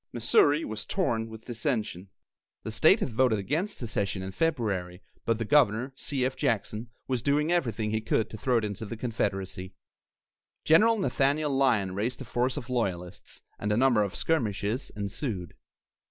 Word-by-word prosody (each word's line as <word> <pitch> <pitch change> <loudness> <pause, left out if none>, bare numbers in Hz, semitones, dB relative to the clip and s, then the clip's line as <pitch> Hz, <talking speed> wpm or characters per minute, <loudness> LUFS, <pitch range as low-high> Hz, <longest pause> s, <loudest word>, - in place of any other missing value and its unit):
Missouri 145 +6 +3
was 110 0 -5
torn 115 -12 0
with 110 0 -11
dissension. 110 - -3 0.5
The - - -4
state - - +5
had - - -1
voted 125 -2 +3
against 155 - -2
secession 100 -5 -2
in 95 - -5
February, 100 - -1 0.2
but 115 -1 +1
the 115 - -2
governor, 130 -1 +3
C. 135 -2 -2
F. 130 - -1
Jackson, 110 +1 -1 0.2
was 130 -3 -1
doing 145 +5 +1
everything 115 - 0
he 110 0 0
could 110 0 +1
to 110 - -6
throw 120 +3 +2
it 115 - 0
into 105 +1 -5
the 115 - -6
Confederacy. 95 -5 -3 0.9
General 225 +8 +5
Nathaniel 145 -5 +1
Lyon 115 -9 +2
raised 110 +6 -2
a 135 - -7
force 125 +3 0
of 125 -5 -5
loyalists, 95 -7 -3 0.2
and 105 - -1
a 105 - +2
number 125 -3 +4
of 100 -2 -2
skirmishes 115 -5 -1
ensued. 100 - -4
115 Hz, 165 wpm, -28 LUFS, 105-135 Hz, 0.9 s, state